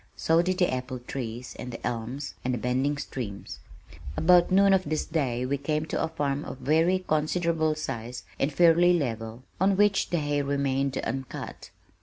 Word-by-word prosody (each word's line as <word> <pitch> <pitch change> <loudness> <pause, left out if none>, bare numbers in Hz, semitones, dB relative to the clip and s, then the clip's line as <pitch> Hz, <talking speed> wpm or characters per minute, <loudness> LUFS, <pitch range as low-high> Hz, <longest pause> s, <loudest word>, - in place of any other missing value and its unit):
So 165 +1 +3
did 185 +1 -1
the 180 -7 +2
apple 130 0 -3
trees 125 -1 -6
and 125 - -5
the 115 - -7
elms 120 +4 -4
and 125 0 0
the - - -3
bending 130 +5 0
streams. 105 -8 -6 0.6
About 175 +1 +5
noon 195 +1 +5
of 190 -1 +3
this 155 +1 -2
day 130 -6 -1
we 140 +2 -1
came 150 +2 -1
to 155 - -2
a - - +1
farm 145 -2 -2
of - - -7
very 165 +7 +2
considerable 160 0 +1
size 120 -5 -5 0.2
and 140 - +1
fairly 175 +2 +5
level, 115 -4 -4 0.2
on 190 +1 +3
which 205 -1 +3
the 175 - 0
hay 145 -2 0
remained 140 -1 0
uncut. 135 -1 -5
145 Hz, 175 wpm, -27 LUFS, 125-170 Hz, 0.6 s, About